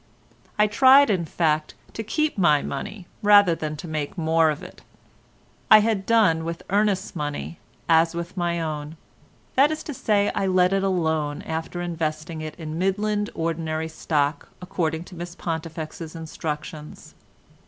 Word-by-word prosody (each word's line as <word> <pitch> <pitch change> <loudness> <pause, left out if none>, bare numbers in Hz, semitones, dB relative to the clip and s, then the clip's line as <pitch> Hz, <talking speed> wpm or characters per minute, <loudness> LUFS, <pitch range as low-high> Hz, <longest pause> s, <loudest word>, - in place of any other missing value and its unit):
I 210 - +5
tried 265 +4 +6
in 180 -4 0
fact 155 -1 0 0.2
to - - -4
keep 305 +8 -1
my 150 -7 +3
money 180 +7 -6 0.2
rather 205 -4 +6
than 155 -1 -4
to 170 - -8
make 155 +1 -4
more 160 -1 +3
of 150 -1 -3
it. - - -12 0.9
I 215 0 +9
had 210 -3 0
done 205 -9 +4
with 170 0 -5
Ernest's 200 -1 +1
money 150 +2 -4 0.3
as 165 +1 +4
with 170 +2 -5
my 175 -2 -1
own—that 160 - -2
is 310 0 -4
to 295 - -6
say 210 -4 +1
I - - -1
had 195 - +1
let 185 0 +3
it 195 - +2
alone 160 -6 0
after 165 +2 -4
investing 160 -1 -3
it 155 0 -6
in 160 -1 -6
Midland 205 +2 0
ordinary 160 -1 -2
stock 150 -2 -1
according 165 -3 -2
to 180 - -13
Miss 175 0 -7
Pontifex's 160 -1 -5
instructions. 155 -1 -6
170 Hz, 155 wpm, -24 LUFS, 155-195 Hz, 0.9 s, I